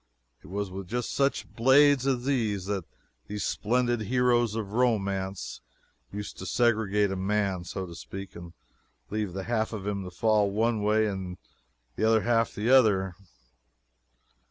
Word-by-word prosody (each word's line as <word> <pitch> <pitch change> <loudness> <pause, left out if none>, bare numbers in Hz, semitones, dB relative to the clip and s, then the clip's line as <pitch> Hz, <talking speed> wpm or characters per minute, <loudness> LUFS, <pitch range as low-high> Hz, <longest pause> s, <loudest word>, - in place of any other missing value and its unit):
It - - -13
was 100 +1 -3
with 95 0 -7
just 120 +4 -3
such 140 0 0
blades 135 +2 +5
as 125 -2 0
these 110 -9 0
that 100 -3 -2 0.4
these 105 0 -4
splendid 120 +1 0
heroes 120 0 +2
of 105 -3 -4
romance 100 -6 -1 0.5
used 105 +1 -7
to 95 - -6
segregate 105 -1 +2
a - - -2
man, 95 -2 -1
so 95 +1 -4
to 85 - -10
speak, 95 +3 -8
and 85 -1 -10 0.6
leave 105 -4 -2
the 95 0 -4
half 110 +1 -1
of 100 -3 -5
him 100 -1 -2
to 90 - -6
fall 105 +2 +2
one 110 +2 0
way 110 +1 +3
and 95 -3 -4 0.6
the - - -1
other 110 0 +4
half 115 +1 +1
the 110 +4 0
other. 100 -8 +4
105 Hz, 155 wpm, -28 LUFS, 95-120 Hz, 0.6 s, blades